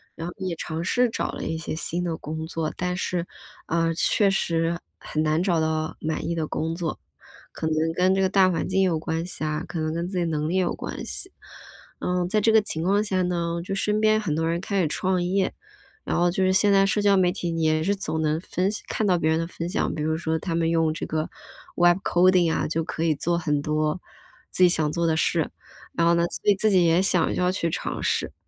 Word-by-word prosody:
然 165 - -6
后 175 - -5
也 185 -3 -3
尝 160 0 -4
试 245 +7 +2
找 - - -2
了 - - -5
一 160 0 -2
些 160 - -4
新 170 +3 -3
的 165 -2 -1
工 160 +1 -5
作， 160 -2 -3
但 180 0 -1
是， 180 -2 -2 0.4
呃， 165 0 +1
确 200 +4 +2
实 170 -2 0 0.2
很 155 0 -2
难 155 +3 +1
找 175 -4 +2
到 155 0 -1
满 160 0 -3
意 - - 0
的 160 -2 -2
工 160 +1 -2
作， 165 -2 -4 0.5
可 160 - -4
能 155 - 0 0.2
跟 185 +2 +3
这 195 - +1
个 190 - +2
大 190 -1 +4
环 165 -3 -2
境 190 +1 +2
有 180 -4 +2
关 160 +1 -3
系 180 - -7
啊， 155 +2 -2
可 170 - -6
能 155 0 -1
跟 170 +1 -2
自 185 - -4
己 175 - +1
能 155 -2 -1
力 170 - -1
有 185 -2 +1
关 - - -6
系。 375 - -6 0.7
呃， 180 0 0
在 215 +2 +2
这 220 +2 +3
个 220 - +6
情 160 -5 -4
况 200 +4 +2
下 190 -3 0
呢， 170 -1 -1
就 195 - -3
身 210 +2 0
边 215 0 +3
很 170 -8 -1
多 160 +1 0
人 170 +1 -1
开 200 0 0
始 165 - +1
创 185 +3 0
业， 190 +2 0 0.5
然 - - -1
后 175 0 +3
就 190 - 0
是 185 - +3
现 200 +2 +4
在 195 0 +5
社 205 +1 +1
交 200 -1 +4
媒 180 -2 +3
体 175 -3 -3
也 155 0 +2
是 200 +4 +1
总 160 -5 -3
能 155 0 +1
分 185 +1 -1
享 210 - -6
看 215 - -1
到 180 -2 +3
别 160 -2 +1
人 160 0 +2
的 165 - -2
分 170 0 -5
享， 195 - -1
比 155 - -3
如 160 +1 0
说 160 -1 -1
他 170 +1 -3
们 165 -1 +1
用 165 -1 +2
这 165 - -4
个 155 0 -2 0.5
web 175 0 +5
coding 180 -1 +4
啊， - - 0
就 165 +1 -1
可 160 - -4
以 160 -2 +2
做 170 +4 0
很 150 -4 0
多 155 +3 -1 0.5
自 185 - +2
己 180 - +7
想 155 -3 +1
做 170 +1 0
的 160 - +2
事。 160 0 +1 0.4
然 170 - +1
后 170 - +5
呢， 170 0 +2
所 205 - +1
以 - - +3
自 215 +3 +2
己 185 -2 +5
也 165 +2 +4
想 185 -3 +2
要 180 0 +1
去 170 -3 -1
尝 - - -4
试。 - - 0
170 Hz, 280 characters per minute, -25 LUFS, 160-185 Hz, 0.7 s, 己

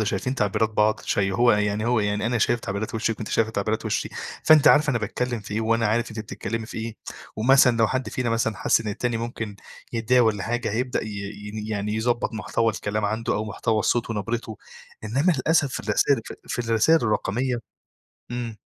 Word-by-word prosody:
وشايفين 105 +4 -1
تعبيرات 105 -1 +1
بعض 110 0 +2
شي 95 -1 0
هو 120 +5 +4
يعني 105 0 0
هو 120 -1 +2
يعني 105 +1 0
أنا 120 +1 0
شايف 120 +2 +2
تعبيرات 100 +1 -4
وِشِّك 115 0 0
وأنتِ 110 - -5
شايفة 110 -1 +1
تعبيرات 110 +1 -2
وِشّي، - - -1 0.4
فأنتِ 155 -2 +7
عارفة 150 0 +5
أنا 120 - +1
باتكلّم 120 +2 -2
في 105 0 -7
إيه، 110 - 0
وأنا 115 0 +2
عارف 115 +3 0
أنتِ 110 - -8
بتتكلّمي 110 +1 -5
في - - -7
إيه، 110 0 -5 0.4
ومثلًا 125 +2 +5
لو 115 -1 +4
حد 130 +3 -2
فينا 125 -2 -2
مثلًا 115 -2 0
حَس - - +2
إن 110 - -4
التاني 115 +3 -1
ممكن 115 -3 -5 0.4
يتضايق 120 +2 +3
والّا 105 -3 +1
حاجة 120 +1 -2
هيبدأ 125 +3 -1
ي - - -6 0.4
يني 105 +1 -6
يعني 105 0 -2
يضبّط 120 +2 0
محتوى 115 +1 0
الكلام 105 0 -2
عنده 110 +3 -1
أو 105 - -1
محتوى 110 +1 -1
الصوت 120 +3 +1
ونَبرِتُه. 115 +1 -3 0.5
إنّما 140 - +2
للأسف 145 0 +2
في - - -3
الرسايل 140 -4 +2
ف - - -6
في - - -4
الرسايل 115 +7 +3
الرقمية 120 +3 0 0.7
إمم. 120 -2 -4
115 Hz, 195 wpm, -24 LUFS, 105-120 Hz, 0.7 s, فأنتِ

